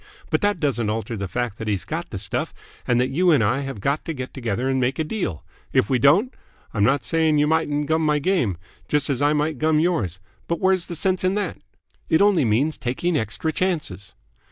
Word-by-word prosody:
But - - +2
that 205 -3 +1
doesn't 120 -8 0
alter 115 +2 -3
the 100 -2 -4
fact 120 +1 -3
that 110 - -5
he's 100 -5 -1
got - - -4
the - - -5
stuff - - -3 0.3
and 120 -1 +3
that 125 - +1
you 180 +6 +2
and 145 -8 +5
I 115 +6 +1
have 135 -5 -5
got 140 +9 -1
to 165 - -3
get 130 -3 -6
together 120 -1 -2
and 135 0 +1
make 130 +1 0
a 160 - 0
deal. 155 - -3 0.3
If 100 - +2
we 130 - +3
don't, 180 - +4 0.4
I'm 105 - +1
not 135 +6 +3
saying 160 -2 +2
you 145 - +4
mightn't 150 -2 +1
gum 160 +2 +1
my 150 -1 +2
game, 145 - +1 0.3
just 150 -1 +1
as 135 0 -1
I 145 +1 +3
might 150 -2 -1
gum 155 0 +3
yours; 135 - 0 0.3
but 170 - -1
where's 185 -2 +2
the 170 - -5
sense 185 +3 0
in 185 +1 +2
that? 205 -4 -2 0.5
It 160 - +4
only 200 -8 +4
means 130 +8 +1
taking 145 +8 -1
extra 110 +7 -1
chances. 150 - -2
145 Hz, 225 wpm, -23 LUFS, 120-165 Hz, 0.5 s, and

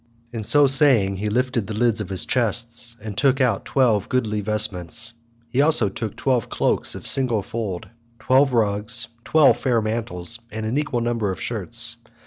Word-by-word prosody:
So 145 +7 +3
saying 130 -8 +3
he 105 +2 -3
lifted 120 -1 -1
the 110 - -5
lids 115 -1 +1
of 100 - -6
his 95 -2 -3
chests, 120 0 -1
and 105 -2 -6
took 135 +3 +2
out 125 -3 0
twelve 115 -7 +1
goodly 110 -5 -1
vestments. 105 -1 0 0.3
He 125 +3 -3
took 145 - +5
also 150 -10 +5
twelve 115 +3 -2
cloaks - - -1
of - - -9
single 120 -6 +4
fold, 100 -5 -5 0.3
twelve 135 +3 +2
rugs, 110 +1 0
twelve 145 -7 +4
fair 120 -1 0
mantles, 110 -2 -2
and 110 0 -5
an 120 +6 -1
equal 130 -5 -2
number 115 -4 -1
of 95 - -7
shirts. 115 +2 -2
115 Hz, 165 wpm, -22 LUFS, 105-125 Hz, 0.3 s, took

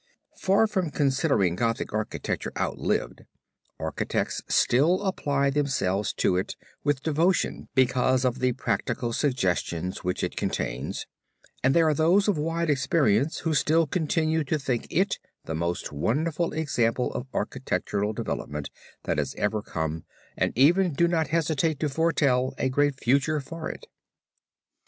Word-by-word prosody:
Far 195 +3 +3
from 190 -6 -1
considering 135 - +1
Gothic 115 +2 -1
architecture 110 0 -3
outlived, - - -1 0.6
architects - - -2
still 165 +10 +3
apply 140 -7 0
themselves 105 -9 0
to 90 - +1
it 95 - -2 0.3
with 145 -2 0
devotion 165 +4 +1
because 130 0 +3
of 125 0 0
the 130 -1 +2
practical 120 -1 -2
suggestions 90 - -1
which 90 0 -2
it - - -2
contains, - - -3 0.6
and 135 +1 +3
there 165 -1 +5
are 155 - +4
those 170 +7 +3
of 205 - +3
wide 165 +2 -1
experience, 140 -2 +2
who 160 - 0
still 155 +3 +3
continue 160 0 0
to 155 +3 0
think 130 -5 -2
it 190 +4 +1 0.3
the 80 - -4
most 85 +2 -2
wonderful 150 - 0
example 125 -6 0
of 130 - -4
architectural 105 +1 -2
development 75 -8 -4 0.3
that - - -1
has - - -2
ever 105 +1 0
come, 80 -4 -4 0.3
and - - 0
even 170 +6 +4
do 170 +4 +3
not 165 -3 +1
hesitate 160 -1 0
to 155 - +1
foretell 135 -4 +1
a 130 - 0
great 145 0 +1
future 140 +5 +2
for 160 +3 -6
it. - - -8
140 Hz, 140 wpm, -26 LUFS, 115-160 Hz, 0.6 s, there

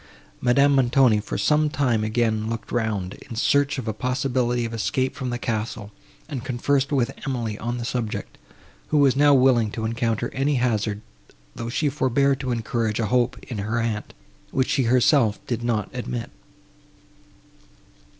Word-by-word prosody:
Madame 140 +3 +4
Montoni, 125 -3 +4
after 105 - -4
some 150 0 +2
time, 125 -7 +1
again 110 -1 0
looked 115 -2 -5
round, 105 -6 -1 0.2
in 115 - -6
search 140 +5 +2
of 125 -4 -5
a 110 - -1
possibility 125 +1 0
of 115 - -5
escape 130 +4 -1
from 130 -2 -4
the 120 - -2
castle, 110 -3 -3 0.4
and 140 -6 -5
conversed 135 +2 0
with 135 -2 +1 0.2
Emily 120 -5 -2
on 120 +1 -3
the 120 - -4
subject, 120 -3 -4 0.5
who 155 - +1
was 140 -3 +4
now 145 0 +5
willing 125 -4 +4
to 110 +1 -4
encounter 115 0 -1
any 140 +2 +1
hazard, 110 -4 0 0.5
though 115 - -5
she 145 +5 0
forbore 140 0 +2
to 130 -1 -3
encourage 115 -2 -1
a 110 - +1
hope 125 -1 +2
in 115 -5 -6
her 110 +4 -1
aunt, 115 -2 -3 0.3
which 130 -1 0
she 135 - +2
herself 120 -2 +3
did 120 -1 -3
not 110 -4 0
admit. 60 -1 -4
120 Hz, 160 wpm, -24 LUFS, 110-135 Hz, 0.5 s, now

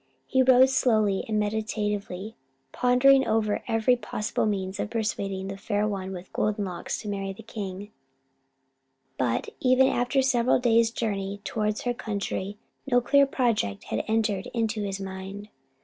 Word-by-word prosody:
He 260 - +2
rode 260 0 +6
slowly 215 -7 +2
and 215 -1 0
meditatively, 210 -1 -2 0.4
pondering 265 +2 +4
over 215 -1 +1
every 225 +1 +3
possible 220 -2 -2
means 190 -2 -2
of - - -2
persuading 200 -4 -2
the 195 0 -5
Fair 205 +1 -1
One 190 -2 -4
with 185 -1 -9
Golden 210 -1 0
Locks 175 -2 -4
to - - -7
marry 195 -1 -3
the 225 - -12
king; 205 -2 -6 1.3
but, 120 -2 0
even 255 0 +4
after 260 +1 +1
several 255 -2 +3
days' 230 -2 +3
journey 200 -4 -3
towards 215 -1 -1
her 245 - -1
country, 205 -3 -4 0.3
no 245 - +6
clear 280 +3 +4
project 230 - 0
had - - 0
entered 220 -3 0
into 225 -1 0
his 195 -1 -3
mind. 195 +2 -7
215 Hz, 150 wpm, -26 LUFS, 195-235 Hz, 1.3 s, rode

